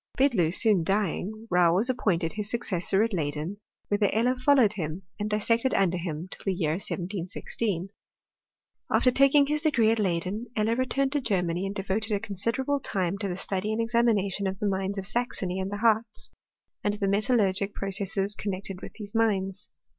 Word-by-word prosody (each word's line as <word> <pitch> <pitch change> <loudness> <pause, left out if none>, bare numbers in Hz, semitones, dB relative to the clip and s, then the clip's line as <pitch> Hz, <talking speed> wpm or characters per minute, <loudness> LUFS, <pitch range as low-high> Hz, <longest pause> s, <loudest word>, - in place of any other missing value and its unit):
Bidloo 240 - +3
soon 200 -2 +5
dying, 205 +4 -1
Rau 175 -1 +4
was 210 +6 +2
appointed 180 -10 0
his 210 -1 -4
successor 195 -4 +1
at 230 -1 -1
Leyden, 155 +3 -2 0.3
whitheir 205 -1 +2
Eiier 250 +4 +1
followed 255 -6 +5
him, 170 -1 -4 0.2
and 210 +1 -2
dissected 230 +4 +1
under 180 -2 +2
him 165 0 -4
till - - -8
the 195 -2 0
year 160 -4 0
1716. 185 +2 -3 1.0
After 255 - +4
taking 275 +2 +5
his 300 +1 0
degree 240 -9 +3
at 225 - +1
Leyd^n, 190 +3 -1
Eller 220 +1 +1
returned 265 +2 0
to 290 -1 0
Germany, 180 -5 0
and 195 - -5
devoted 205 +3 -2
a 205 - +1
considerably 230 +7 -1
timQ 195 -5 -2
to 205 - -2
the 180 -1 -3
study 195 +2 -2
and 220 - -1
examination 225 -4 +1
of 190 0 -3
the 210 - -3
mines 195 +1 -1
of 195 - -2
8axony 195 -4 -1
and 190 - -3
the 205 - -3
Hartz, 220 0 +1 0.5
and 205 0 +1
of - - -12
the 200 - 0
metalluigic 200 -1 +2
pro 195 - -3
r - - -3
cesses 195 +1 -1
connected 195 -1 -5
with - - -9
these 205 -2 -9
mines. 205 -3 0
205 Hz, 185 wpm, -27 LUFS, 190-230 Hz, 1.0 s, soon